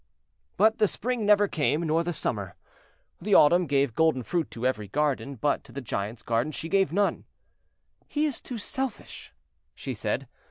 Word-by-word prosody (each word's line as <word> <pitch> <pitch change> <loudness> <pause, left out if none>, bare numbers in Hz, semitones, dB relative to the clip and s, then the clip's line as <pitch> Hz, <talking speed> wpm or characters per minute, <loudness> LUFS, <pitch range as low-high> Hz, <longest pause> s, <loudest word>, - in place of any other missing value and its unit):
But 220 +3 +4
the 215 - +5
Spring 235 0 -2
never 205 0 +5
came, 155 -2 0
nor 165 +1 +1
the 175 - -2
Summer. 100 - -3 0.7
The 205 -1 +2
Autumn 175 +4 +6
gave 140 -3 +1
golden 160 -3 +2
fruit 170 +5 -1
to 120 +1 -6
every 110 -5 0
garden, 140 +2 -1
but 140 +5 0
to - - -15
the 140 - -5
Giant's 110 -2 -4
garden 120 +6 0
she 165 +2 -6
gave 195 -2 +2
none. 200 +3 0 0.8
"He 300 +1 0
is 290 -6 -3
too 245 - -6
selfish," 265 +4 -5 0.4
she - - -5
said. - - -2
160 Hz, 170 wpm, -27 LUFS, 130-205 Hz, 0.8 s, Autumn